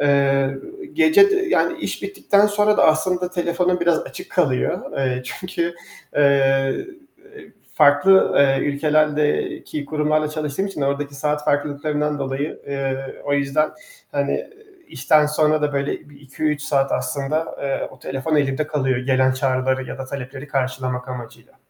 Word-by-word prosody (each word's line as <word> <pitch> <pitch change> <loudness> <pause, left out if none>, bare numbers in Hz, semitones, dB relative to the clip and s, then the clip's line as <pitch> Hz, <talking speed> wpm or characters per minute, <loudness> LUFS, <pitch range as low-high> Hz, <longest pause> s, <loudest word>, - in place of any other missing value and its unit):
Eee, 140 -1 +2 0.3
gece 335 +5 +5
de - - +3
yani, - - +1
iş - - -4
bittikten 210 - +2
sonra 210 0 +2
da - - +4
aslında 180 +3 +2
telefonum 180 0 0
biraz 170 -2 +3
açık - - -9
kalıyor. 140 -9 0
Eee, 130 -2 -1
çünkü, 170 +1 -4 0.4
eee, 135 - +3 0.9
farklı, 155 +6 +5
eee, 135 -1 +4
ülkelerdeki 150 0 0
kurumlarla 150 +1 0
çalıştığım 155 +4 -2
için 195 -6 -7
ordaki 140 +1 -2
saat 150 +1 -2
farklılıklarından 150 +1 -1
dolayı. 135 +2 -3
Eee, 135 -1 -2 0.3
o 145 - -1
yüzden, 140 +2 +1 0.4
hani, 140 -1 -1 0.4
işten 150 +3 +3
sonra 150 0 +2
da 145 -1 0
böyle 140 +1 -3
bir 140 - -17
2-3 150 +2 -2
saat 140 -2 +1
aslında, 150 +3 -2
eee, 140 -1 -2
o 130 - -16
telefon 135 +5 -2
elimde 140 +1 0
kalıyor, 135 -4 0
gelen 130 0 +2
çağrıları 130 0 0
ya - - -7
da 135 - -5
talepleri 135 +1 -7
karşılamak 130 -2 -2
amacıyla. 125 -3 -9
145 Hz, 140 wpm, -21 LUFS, 135-155 Hz, 0.9 s, gece